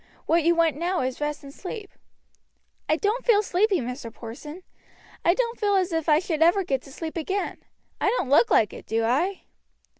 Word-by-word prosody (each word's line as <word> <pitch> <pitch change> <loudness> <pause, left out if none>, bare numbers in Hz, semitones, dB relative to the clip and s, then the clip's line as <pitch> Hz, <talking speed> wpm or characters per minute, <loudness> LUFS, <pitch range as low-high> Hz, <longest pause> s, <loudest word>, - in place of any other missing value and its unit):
What 335 +1 +3
you 340 +2 +3
want 330 -4 +2
now 350 +3 0
is 255 +2 -3
rest 295 0 -2
and 275 0 -10
sleep." 405 +3 -7 1.0
"I 310 - +4
don't 425 +8 -1
feel 430 -3 +4
sleepy, 385 -1 +2
Mr. 245 -1 -6
Porson. 295 +10 -9 0.6
I 345 - +4
don't 470 0 -1
feel 410 -2 +2
as 375 -1 +1
if 325 -1 -1
I 300 - +6
should 320 -2 -2
ever 350 +4 +5
get 270 -7 -1
to 275 - -14
sleep 320 +3 -6
again. 380 +4 -2 0.4
I - - +2
don't - - -1
look 240 -4 +5
like 215 - +3
it, - - -11
do 225 +1 0
I?" 315 - 0
330 Hz, 200 wpm, -25 LUFS, 275-385 Hz, 1.0 s, I